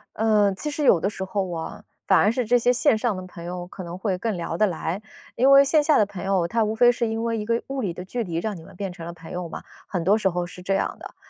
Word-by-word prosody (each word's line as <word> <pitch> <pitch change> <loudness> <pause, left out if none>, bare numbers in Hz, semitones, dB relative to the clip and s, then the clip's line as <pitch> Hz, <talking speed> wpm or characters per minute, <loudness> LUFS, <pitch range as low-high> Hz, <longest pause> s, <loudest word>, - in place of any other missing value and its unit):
嗯， 210 -2 +3
其 300 - -3
实 295 0 -3
有 195 -10 +5
的 190 - 0
时 195 -2 -6
候 190 0 -2
啊， 160 -1 -6 0.2
反 - - +5
而 210 - +4
是 250 0 -1
这 245 +3 +4
些 245 +1 +3
线 250 -1 +3
上 220 -1 0
的 185 0 -6
朋 175 -2 -10
友 175 0 -5
可 190 - -9
能 170 +1 -7
会 190 -1 -1
更 220 +2 -2
聊 170 -1 -4
得 215 - +4
来。 175 +1 -3 0.3
因 260 +3 +4
为 275 0 +9
线 300 +2 +3
下 305 -1 +5
的 210 - +4
朋 200 -2 -8
友， 190 -3 +1
他 225 +3 +2
无 215 +1 -2
非 240 +2 +6
是 240 -1 -1
因 225 +1 -2
为 230 -1 -1
一 210 - -3
个 230 +1 0
物 275 0 -4
理 190 -7 -2
的 180 - -7
距 235 +6 -3
离 170 -3 -5
让 200 +4 -2
你 - - -11
们 160 - -14
变 195 0 -4
成 170 -2 -9
了 170 - -6
朋 165 -1 -12
友 180 -1 -4
嘛， - - -8 0.2
很 180 -4 -2
多 200 +5 +4
时 210 - +1
候 175 0 -2
是 180 +1 -11
这 195 +2 -1
样 195 - -1
的。 - - -10
200 Hz, 330 characters per minute, -24 LUFS, 180-230 Hz, 0.3 s, 为